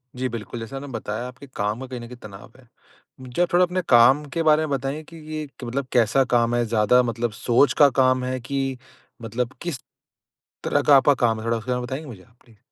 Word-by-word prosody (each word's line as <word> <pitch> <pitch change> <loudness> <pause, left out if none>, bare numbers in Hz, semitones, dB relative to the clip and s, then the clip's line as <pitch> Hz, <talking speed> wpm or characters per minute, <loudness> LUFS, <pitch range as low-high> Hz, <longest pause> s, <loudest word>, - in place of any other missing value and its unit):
जी, 130 +1 -2
बिल्कुल, 115 +1 -6
जैसा 115 +4 -7
आपने 140 +1 -7
बताया 115 -1 -5
आपके 125 +3 -12
काम 105 +2 -2
का 130 - -7
कहीं 125 -1 -6
न 120 - -9
कहीं 125 - -10
तनाव 100 -1 -12
है। 125 - -21 0.5
मुझे 130 +5 -4
आप 175 - 0
थोड़ा 180 +1 +5
अपने 180 +1 -2
काम 130 +4 +6
के 165 - 0
बारे 155 0 +4
में - - -8
बताएँगे 135 +4 -4
कि 165 +2 -14 0.2
ये 155 -1 -4 0.2
मतलब 130 +2 -3
कैसा 125 +3 +3
काम 120 0 +2
है, 120 - +2
ज़्यादा 115 +2 +3
मतलब 115 -1 -2
सोच 120 +6 +2
का 145 -1 +7
काम 130 0 +2
है 130 0 -2
कि 135 0 -3 0.4
मतलब 115 +3 -3
किस 170 -7 -4 0.9
तरह - - +1
का 145 -2 +6
आपका 140 +1 +5
काम 115 -3 +1
है? 115 - -7
थोड़ा 115 0 +1
उसके 125 +3 -7
बारे 125 0 0
में 125 - -5
बताएँगे 140 +5 -5
मुझे 100 -7 -10
आप, 115 +6 -26
प्लीज़। 115 -4 -22
125 Hz, 235 wpm, -23 LUFS, 115-140 Hz, 0.9 s, का